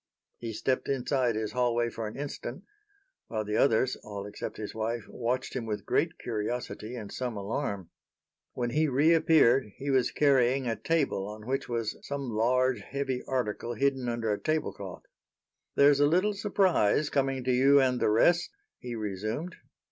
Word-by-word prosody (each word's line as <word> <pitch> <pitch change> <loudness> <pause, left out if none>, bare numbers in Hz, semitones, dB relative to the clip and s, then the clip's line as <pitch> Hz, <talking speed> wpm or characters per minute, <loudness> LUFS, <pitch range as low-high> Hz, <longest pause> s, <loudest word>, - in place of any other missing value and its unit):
He 115 -1 -4
stepped 130 +4 -1
inside 130 -3 +1
his 110 -1 -2
hallway 120 -1 +1
for 115 -1 -4
an 105 - -8
instant, 145 0 -6 0.6
while 110 -2 -3
the 105 +1 -2
others, 130 0 +3
all 100 -1 -7
except 105 0 -6
his 105 -1 -6
wife, 110 0 -3
watched 125 +2 -2
him 120 -3 -3
with 105 -1 -3
great 165 +1 +1
curiosity 115 +1 -4
and 110 -4 -7
some 125 -4 -3
alarm. 100 - -3 0.6
When 120 -1 -2
he 155 +3 +2
reappeared 145 -3 +4
he 140 +1 -3
was 130 -2 +3
carrying 135 -2 +3
a 115 -2 0
table 140 -12 0
on 105 0 -9
which 135 +1 -2
was 115 -2 -2
some 140 -3 -4
large, 125 +2 +2
heavy 135 +2 -3
article 120 -2 -2
hidden 135 0 0
under 115 -2 -1
a - - -3
tablecloth. 145 - -3 0.7
"There's 140 0 +6
a 145 - +5
little 185 +7 +2
surprise 190 - +2
coming 135 -2 0
to 130 - +1
you 135 +3 +5
and 130 -2 +2
the - - +2
rest," 170 +11 +3 0.3
he 120 -1 -6
resumed. 110 - -4
125 Hz, 165 wpm, -29 LUFS, 110-140 Hz, 0.7 s, There's